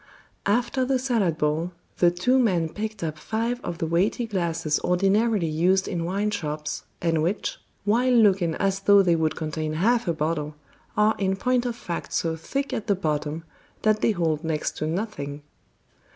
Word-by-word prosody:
After 240 +5 +1
the 260 +1 +2
salad 230 - 0
bowl, 155 +4 0 0.3
the 175 - +6
two 185 +10 +2
men 180 -9 +2
picked 215 +1 -5
up 155 -1 -3
five 230 +5 -2
of 170 - -4
the 165 - -2
weighty 180 +9 +1
glasses 170 -7 -1
ordinarily 195 +2 +2
used 175 +5 +2
in 170 -1 -2
wine 200 +4 0
shops, 150 -4 -4 0.2
and 165 -2 +2
which, 180 +7 -1 0.3
while 240 +5 +3
looking 195 -8 +4
as 195 -1 0
though 200 0 +6
they 175 -2 +3
would 160 -1 0
contain 155 0 -3
half 225 +7 +2
a 170 - +2
bottle, 150 -1 -2 0.4
are 210 +1 +4
in 190 -1 +1
point 250 +3 +1
of 240 - -3
fact 175 -7 -5
so 165 -1 0
thick 275 - -3
at 220 - -3
the 200 - +3
bottom 155 -2 -2 0.4
that 215 0 +3
they - - +3
hold 165 -6 0
next 160 -2 -2
to 155 - -2
nothing. 155 -6 -4
180 Hz, 175 wpm, -25 LUFS, 160-215 Hz, 0.4 s, the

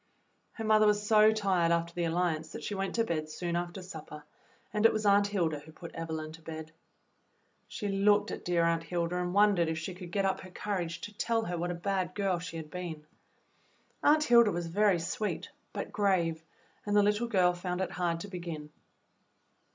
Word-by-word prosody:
^ - - -42 0.5
Her 225 - -6
mother 215 0 +5
was 210 0 +2
so 215 0 +6
tired 190 -6 +2
after 170 0 0
the 175 -1 -1
Alliance 165 -2 -1
that - - -7
she - - -3
went 195 -1 -2
to 230 - +3
bed 155 -7 -2
soon 170 +2 -3
after 175 +2 -3
supper, 155 -4 -9 0.5
and 210 0 0
it - - +1
was 215 0 -2
Aunt 200 0 +5
Hilda 170 -7 0
who 150 +2 -14
put 170 +1 -10
Evelyn 160 -1 -4
to 165 +1 -12
bed. 160 0 -7 1.0
She 210 - -5
looked 205 +1 +3
at - - -6
dear 175 -1 +2
Aunt 165 0 +2
Hilda 170 +1 -2
and 180 0 -1
wondered 200 -3 +4
if 160 - -2
she 165 +4 -4
could 180 -1 -9
get 195 +1 +1
up 190 - +1
her 185 - -10
courage 180 -3 -3
to 210 - -8
tell 225 +1 0
her 175 - -3
what 175 +1 -2
a 175 - -2
bad 185 0 -2
girl 195 -4 0
she 170 -1 -6
had 155 -2 -8
been. 170 -4 -6 1.0
Aunt 305 +1 +5
Hilda 235 -5 +6
was 175 -1 -2
very 195 +2 +3
sweet, 180 +2 -3 0.2
but 200 - -5
grave, 185 -6 +1 0.4
and 205 0 -1
the 205 - +6
little 210 +3 +1
girl 185 -5 +3
found 180 0 -3
it 190 - -1
hard 170 -2 -1
to 205 - -6
begin. 170 -5 -6
180 Hz, 205 wpm, -31 LUFS, 165-205 Hz, 1.0 s, so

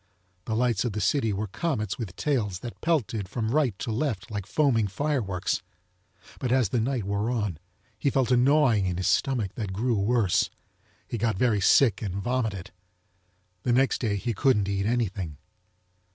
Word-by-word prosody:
The 110 - -2
lites 120 -3 +1
of 120 -4 -2
the 105 - -2
city 110 +3 +1
were 100 +2 -2
comets 110 - -2
with 105 -7 -5
tails 105 -11 -1
that 120 - -8
pelted 115 - 0
from 110 0 -2
rite 130 -8 +1
to 115 - -4
left 115 -3 -2
like 100 -2 -4
foaming 115 -4 +2
fireworks. 105 - -1 0.8
But 125 - -2
as 130 -6 +3
the 120 - 0
nite 120 0 -1
wore 100 +3 -1
on 105 -9 -2 0.4
he 140 - +2
felt 130 -3 +1
a - - +6
gnawing 125 -6 +4
in 90 -1 -2
his 95 - -2
stomach, 115 -8 +1
that 105 -5 -4
grew 120 +5 0
worse. 105 -1 +2 0.6
He 120 - -4
got 110 -3 0
very 110 -3 +2
sick 110 +1 +4
and 95 -4 -3
vomited. 105 -4 -2 0.9
The 120 - +1
next 135 +2 +2
day 110 -4 0
he 115 +4 -2
couldn't 105 -2 +2
eat 100 0 -1
anything. 100 -10 -1
110 Hz, 175 wpm, -27 LUFS, 100-125 Hz, 0.9 s, a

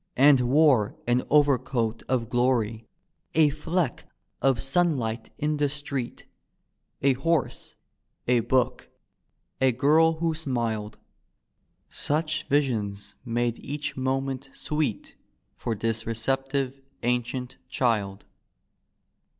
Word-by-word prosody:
And 140 +1 +7
wore 135 -7 +4
an 120 +1 +2
overcoat 130 -6 +2
of 125 -3 +1
gloiy. 115 -2 +1 0.5
A 155 -2 +6
fleck 155 0 -2 0.3
of 135 -3 +3
sunlight 135 -7 0
in 150 0 0
the 145 -1 +1
street, 140 -3 -5 0.8
A 135 -1 +5
horse, 150 +2 -1 0.5
a 125 0 +4
book, 125 +2 0 0.7
a 130 -1 +5
girl 150 +6 +4
who 165 0 -1
smiled. 115 -8 -2 0.9
Such 155 +1 -1
visions 115 -9 0
made 120 -1 -1
each 150 +1 -4
moment 135 0 -2
sweet 150 -8 -2 0.4
For 115 - -3
this 115 +1 -2
receptive 135 +3 -1 0.2
ancient 125 +1 -1
child. 105 -7 0
130 Hz, 100 wpm, -26 LUFS, 115-145 Hz, 0.9 s, And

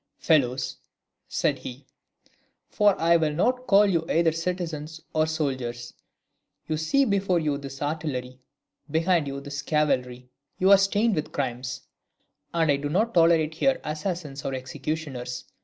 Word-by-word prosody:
"Fellows," 130 -4 +1 0.5
said - - 0
he, 130 +2 -9 0.8
"for 205 -2 +3
I 170 +1 +5
will 155 -2 0
not 250 +10 0
call 200 +1 +6
you 170 -5 +1
either 165 0 +3
citizens 165 -2 -4
or 155 0 +2
soldiers, 130 -6 -3 0.7
you 155 - 0
see 270 - +2
before 195 -5 +1
you 150 -3 -1
this 135 0 -7
artillery, 140 -4 -3 0.5
behind 165 0 +2
you 140 0 -4
this 140 0 -6
cavalry; 125 -4 -1 0.3
you 190 +2 +4
are 200 - +10
stained 205 +3 +2
with 155 -4 -2
crimes, 125 -1 -3 0.7
and 165 -3 +2
I 140 - +2
do 145 +1 -3
not 215 +9 +1
tolerate 165 -2 +4
here 270 +12 +1
assassins 155 -3 -4
or 135 - -2
executioners. 130 -1 -5
155 Hz, 140 wpm, -26 LUFS, 135-170 Hz, 0.8 s, are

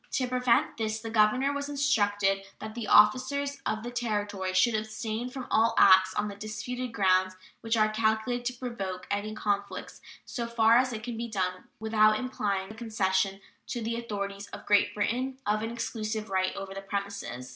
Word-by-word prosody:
To 255 - +1
prevent 250 +4 +2
this 220 -1 -2
the 225 0 -6
governor 230 +6 +3
was 285 0 -3
instructed 205 -9 +2 0.2
"that 220 0 -7
the 230 -2 -5
officers 270 +7 +4
of 215 0 -2
the 240 - -5
Territory 205 -5 -2
should 230 +5 +4
abstain 220 +2 -3
from 255 0 -6
all 225 +1 +3
acts 190 -1 +6
on 210 0 0
the 205 - -5
disputed 235 +4 -5
grounds 185 -2 +2 0.3
which 225 0 0
are 215 -1 +4
calculated 220 +3 0
to 250 - -1
provoke 195 -7 -5
any 205 +1 -2
conflicts, 200 -1 -3 0.2
so 235 -2 -4
far 230 0 +4
as 255 0 +2
it 220 -2 -5
can 235 -1 -5
be 235 +1 -3
done 185 -4 -2
without 215 -1 +4
implying 200 -6 -2
the - - -8
concession 195 -4 0 0.3
to 245 - -3
the 230 +1 -2
authorities 200 -3 -4
of - - -10
Great 205 -1 +3
Britain 250 +5 -1
of 210 +1 +1
an 225 - -2
exclusive 220 -2 -4
right 185 0 0
over 195 0 -6
the 195 - -6
premises. 195 - -5
215 Hz, 180 wpm, -28 LUFS, 200-235 Hz, 0.3 s, acts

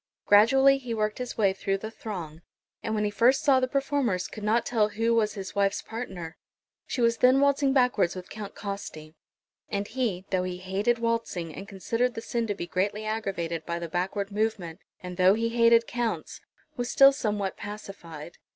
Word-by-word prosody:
Gradually 270 +6 +6
he 245 -3 -4
worked 215 +1 -1
his 250 -1 -5
way 200 -3 +3
through 195 0 -1
the 220 +3 -7
throng, 175 -9 -7 0.4
and 220 - -2
when 210 - 0
he 205 - 0
first 235 +6 +3
saw 270 -3 +5
the 255 - 0
performers 270 -8 0
could 215 - -9
not 220 +3 +2
tell 215 -3 +2
who 225 +2 0
was 215 -2 +1
his 195 -2 -6
wife's 200 0 +1
partner. 190 -8 -7 0.5
She 250 - -2
was 230 0 +3
then 255 +2 +5
waltzing 280 0 +3
backwards 245 -9 +2
with 180 -1 -7
Count 205 -1 -8
Costi; 195 -6 -7 0.6
and 200 0 -2
he, 220 -7 -2
though 185 -1 +2
he 180 0 -4
hated 195 +6 0
waltzing, 230 -8 -2
and 195 - -8
considered 230 +5 -1
the 225 - -4
sin 235 0 -2
to 205 - -2
be 175 - -5
greatly 200 +5 -2
aggravated 190 -7 -3
by 170 0 -3
the 170 0 -5
backward 195 +4 -2
movement, 205 -6 -2 0.2
and 180 -1 -7
though 185 +1 +5
he 230 +1 0
hated 230 0 +4
Counts, 240 -2 -3 0.3
was 245 0 -3
still 275 0 +7
somewhat 205 -7 -2
pacified. 175 -6 -9
210 Hz, 190 wpm, -27 LUFS, 190-235 Hz, 0.6 s, still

